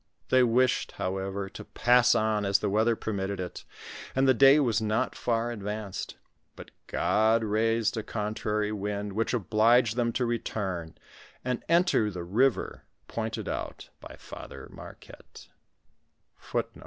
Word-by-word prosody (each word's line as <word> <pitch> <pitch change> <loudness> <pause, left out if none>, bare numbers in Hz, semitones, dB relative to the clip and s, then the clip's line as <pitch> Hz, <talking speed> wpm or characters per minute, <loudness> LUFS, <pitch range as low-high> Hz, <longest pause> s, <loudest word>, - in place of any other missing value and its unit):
They 130 - +5
wished, 125 +1 +2
however, 95 +1 -3
to - - -9
pass 125 0 +3
on, 110 -1 +1
as 100 0 +3
the 100 0 -2
weather 110 +3 +2
permitted 100 -3 -3
it, 90 -1 -6 0.5
and 135 +1 +3
the 130 - +6
day 135 +3 +7
was 115 -6 +1
not 110 0 0
far 120 0 -1
advanced; 105 -2 -5 0.4
but - - -12 0.2
God 110 +1 +2
raised 110 +1 +1
a 110 - -2
contrary 105 0 -2
wind, 105 -1 -3
which 115 +3 -1
obliged 115 +2 +3
them 120 -1 +1
to 125 - 0
return 95 -8 -3 0.5
and 125 -1 -2
enter 170 - +3
the 90 -3 -6
river 115 +8 +1 0.3
pointed - - -4
out - - -5
by - - -11
Father - - -10
Marquette. - - -13
110 Hz, 135 wpm, -28 LUFS, 105-120 Hz, 0.5 s, day